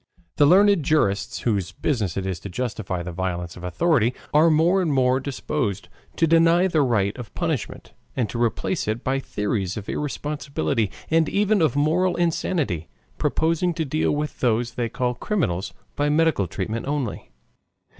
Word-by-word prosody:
The 145 - +6
learned 200 +2 +5
jurists 105 -10 0
whose 100 -6 -1
business 105 - -1
it 95 - -2
is 95 -3 -3
to 100 - -8
justify 100 -4 -3
the 90 - -5
violence 90 -1 -3
of 90 - -11
authority, 125 - +1 0.2
are 155 +3 +6
more 165 +5 +3
and 170 -4 0
more 130 -1 +3
disposed 130 -6 -3 0.3
to 165 - +3
deny 165 +2 +4
the 165 -5 +2
right 110 -7 +1
of 115 -5 -8
punishment - - -3 0.2
and 120 -4 0
to 120 - -3
replace 120 - -1
it 110 +2 -2
by 135 +1 0
theories 105 -5 -2
of 105 - -6
irresponsibility 140 - -2 0.2
and 160 -1 +3
even 205 -1 +2
of 155 -6 +2
moral 170 +5 +2
insanity, 160 - -1 0.3
proposing 165 +2 +1
to 160 -2 -1
deal 155 +3 0
with 150 0 -3
those 120 0 +1
they 120 -1 -2
call 125 +1 -1
criminals 120 - -2 0.2
by 145 0 +1
medical 155 - +2
treatment 110 +8 -4
only. 140 -6 -3
130 Hz, 165 wpm, -23 LUFS, 105-160 Hz, 0.3 s, The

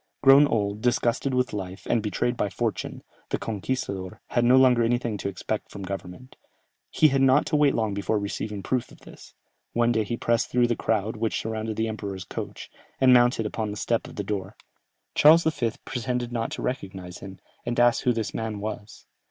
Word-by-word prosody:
Grown 140 +1 +8
old, 105 -3 -1
disgusted 125 +2 +1
with 125 -2 0
life, 95 -1 -6
and 115 - +2
betrayed 115 +3 -1
by 105 - -1
fortune, - - -3 0.3
the - - 0
"conquistador" 100 -4 -4
had 120 - +1
no 125 +2 +6
longer 125 -2 +5
anything 120 -1 0
to 100 - -2
expect 100 +3 -4
from 100 - -8
government. 95 +5 -7 0.5
He 155 - +4
had 135 -1 +1
not 135 +2 +5
to 155 - -1
wait 145 -2 +4
long 110 -3 0
before 100 +2 -1
receiving 100 0 -4
proof 125 +4 -1
of - - -17
this; - - -14 0.4
one 120 0 +3
day 110 -2 +1
he 115 +3 -3
pressed 115 -1 +1
through 125 0 +3
the 120 0 +1
crowd 110 0 -1
which 115 0 -1
surrounded 110 0 -3
the 110 +1 0
emperor's 100 -4 -5
coach, - - -7 0.3
and 130 -1 +6
mounted 120 -2 +4
upon 110 0 -3
the 105 - -5
step 115 +2 -1
of - - -12
the 100 - -3
door. 100 0 -4 0.6
Charles 160 +3 +7
V. 130 -8 0
pretended 125 -1 -3
not 115 -1 -2
to - - -5
recognize 95 -8 -5
him, 95 -1 -9 0.3
and 120 0 -2
asked 120 0 +4
who 125 - +2
this 115 -3 -2
man 110 -2 -3
was. 105 0 -7
115 Hz, 195 wpm, -26 LUFS, 105-125 Hz, 0.6 s, Grown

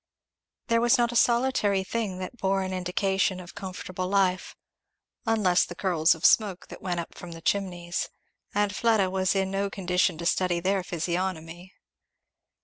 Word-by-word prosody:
There 230 0 +2
was 240 +3 +4
not 240 -1 +2
a - - -6
solitary 235 -5 +2
thing 205 -2 -3
that 185 +5 -6
bore 195 0 +1
an 185 0 -4
indication 185 +1 0
of 180 -1 -10
comfortable 185 -1 -5
life, 185 -2 +1 0.7
unless 205 -6 +3
the 175 - -7
curls 170 -4 +2
of 160 - -5
smoke 200 -5 +3
that - - -10
went 175 -2 -2
up 170 - -6
from 175 -1 -9
the 165 - -9
chimneys; 175 -3 -1 0.4
and 205 -1 0
Fleda 215 -5 +2
was 190 0 +1
in 190 -1 0
no 200 +1 -1
condition 180 -4 0
to 170 - -6
study 180 -1 +1
their 190 +2 +1
physiognomy. 175 0 -4
190 Hz, 160 wpm, -27 LUFS, 180-200 Hz, 0.7 s, was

